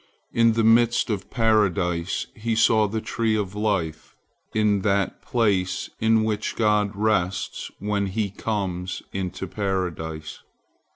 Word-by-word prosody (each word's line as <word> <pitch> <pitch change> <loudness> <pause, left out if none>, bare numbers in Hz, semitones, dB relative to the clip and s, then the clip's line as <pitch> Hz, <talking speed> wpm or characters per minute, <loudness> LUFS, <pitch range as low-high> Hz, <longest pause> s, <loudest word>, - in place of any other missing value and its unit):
In 115 -1 +4
the 115 0 +1
midst 115 +1 +4
of 95 -2 -3
Paradise 100 -6 +1
he 115 +1 -2
saw 110 -1 +4
the 110 +2 -3
tree 115 -1 0
of 100 -3 -2
life, 100 -7 -2 0.4
in 105 -2 +2
that 100 -1 0
place 95 -6 0
in 110 0 +3
which 105 -1 -2
God 105 -2 +2
rests 100 -3 -1
when 100 -1 -1
He 100 0 -2
comes 95 -4 -3
into 95 0 -3
Paradise. 85 -5 -3
105 Hz, 125 wpm, -24 LUFS, 95-110 Hz, 0.4 s, In